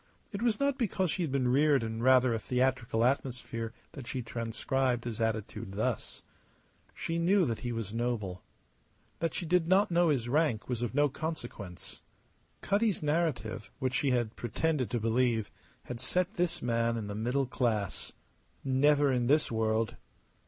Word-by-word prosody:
It 200 - -5
was 230 -3 +1
not 280 -1 +1
because 190 -7 0
she 185 - -2
had 160 -5 -1
been 130 -2 +1
reared 140 0 +4
in 115 0 -3
rather 130 -1 +5
a 115 - -1
theatrical 125 -1 +1
atmosphere 125 -3 -1 0.2
that 135 -5 -9
she 125 0 -3
transcribed 120 +2 -1
his 115 -2 -4
attitude 110 -3 -2
thus. 110 +2 -2 0.7
She 165 0 -2
knew 185 +2 +4
that 115 -5 -2
he 120 - -3
was 115 -3 -4
noble. 115 -6 -2 0.8
That 165 - -1
she 175 - -3
did 170 0 +2
not 190 +2 +4
know 170 0 +4
his 130 -6 +1
rank 140 -4 +1
was 120 -2 -2
of 120 +1 -2
no 145 0 +5
consequence. 120 - -6 0.6
Cutty's 205 -3 +1
narrative, 145 - -1
which 130 -2 -1
she 140 - +1
had 120 -3 0
pretended 130 +3 -1
to 120 - -1
believe, 115 0 +1 0.3
had 125 -1 -6
set 180 - 0
this 175 -4 -1
man 115 -1 +1
in 110 - -3
the 100 - -5
middle 125 +6 0
class. 115 -6 -1 0.5
Never 140 +2 +4
in 120 -1 +1
this 150 +1 +3
world. 110 0 0
125 Hz, 165 wpm, -31 LUFS, 115-155 Hz, 0.8 s, rather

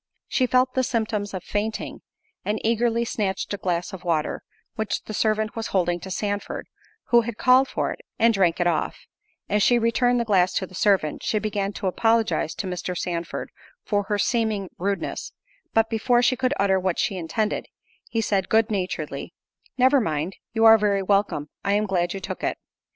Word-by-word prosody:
She 255 - +1
felt 255 +1 +3
the 260 - +2
symptoms 215 -4 -1
of 185 -2 -5
fainting, 215 +2 -3 0.4
and 210 +1 -1
eagerly 235 +1 +2
snatched 200 -3 -2
a - - -2
glass 180 +1 -2
of 185 - -8
water, 165 -4 -1 0.3
which 220 -3 -2
the 215 - -7
servant 215 +1 0
was 225 -1 -3
holding 175 -2 +1
to 190 - -8
Sandford, 205 +2 -3 0.4
who 240 -1 +6
had 230 -1 -5
called 260 +1 +5
for - - -2
it, - - -7 0.2
and 230 0 +4
drank 185 -5 +2
it 175 - +2
off;—as 175 +4 -3
she 240 +4 +5
returned 240 +1 +2
the 235 - 0
glass 185 -4 +3
to 190 - 0
the 185 - -17
servant, 185 -6 +1
she 215 - 0
began 205 -2 -1
to 200 - -6
apologize 200 -5 +1
to - - -4
Mr. 180 0 -3
Sandford 170 -1 -4 0.3
for 205 -2 0
her 205 +1 0
seeming 215 -3 0
rudeness, 200 +2 -3 0.4
but 225 0 +3
before 240 +2 +2
she 255 - +4
could 260 +2 0
utter 190 -1 +3
what 185 -2 -1
she 195 - 0
intended, 185 +5 -2 0.4
he 225 - 0
said, 195 -3 0
good 220 0 +3
naturedly, 190 -3 -3 0.4
"Never 260 +2 +5
mind—you 185 +7 -1
are 225 0 +9
very 200 -2 +1
welcome—I 200 -2 0
am 210 +1 +2
glad 180 -2 0
you - - -4
took - - -6
it." - - 0
205 Hz, 180 wpm, -24 LUFS, 185-225 Hz, 0.4 s, are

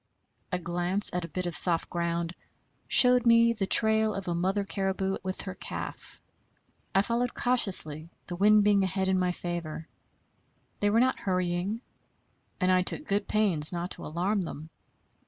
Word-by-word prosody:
A 180 - -1
glance 175 +3 -3
at 180 -1 -3
a - - -9
bit 180 +3 -5
of 175 - -4
soft 170 0 +6
ground 170 0 -3 0.5
showed 250 -1 +6
me 230 0 +4
the 205 -4 -4
trail 220 -1 +3
of 195 -1 -7
a 175 - -2
mother 190 +4 -1
caribou 195 -1 -3
with 185 0 -6
her 190 - -7
calf. - - -9 0.8
I 195 - +3
followed 235 +2 -2
cautiously, 180 -10 +2 0.2
the 175 - -7
wind 210 +3 +3
being 205 -1 +2
ahead 190 0 -2
in 190 -1 +1
my 180 -1 0
favor. 170 -2 -7 0.9
They 205 - 0
were 220 +2 +2
not 260 +2 +1
hurrying, 185 +3 -3 0.8
and 185 -2 +1
I 185 0 +3
took 240 +11 -1
good 200 +1 -2
pains 185 -9 +4
not 175 +1 -5
to - - -5
alarm 185 +6 -2
them. 160 -2 -8
190 Hz, 165 wpm, -27 LUFS, 175-210 Hz, 0.9 s, soft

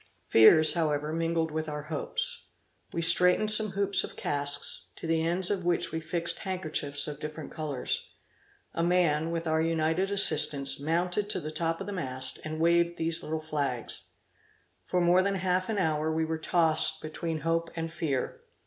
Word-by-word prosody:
Fears, 155 +8 +7
however, 150 -2 -1
mingled 165 -1 -1
with 155 0 -4
our 150 -1 -5
hopes. 150 -1 -3 0.4
We 170 - -2
straightened 180 +5 +4
some 215 -2 +5
hoops 200 0 +2
of - - -7
casks, 145 0 -1
to - - -9
the 165 0 0
ends 175 +3 +1
of 195 -3 -2
which 175 -1 -1
we 160 - -3
fixed 165 +1 -3
handkerchiefs 155 -7 -3
of 150 -1 -7
different 150 0 -8
colors. 150 -5 -4 0.7
A - - -2
man, 165 -3 +1
with 165 0 -4
our 160 0 +1
united 165 +3 0
assistance, 145 -8 +5
mounted 175 +7 -1
to 200 - -1
the 155 -2 -6
top 165 +1 -2
of - - -6
the 205 - -6
mast, 130 -8 -3
and 155 0 -6
waved 170 +1 +2
these 165 +1 -1
little 155 0 -4
flags. 145 -6 -4 0.8
For 180 - -1
more 175 +2 +4
than 200 +1 -1
half 185 +1 -1
an 220 - -2
hour, 160 -3 0
we 160 0 -1
were 160 0 -4
tossed 160 -2 +2
between 155 0 -5
hope 165 +1 -1
and 165 -1 -4
fear. 145 -7 -3
165 Hz, 175 wpm, -28 LUFS, 155-175 Hz, 0.8 s, Fears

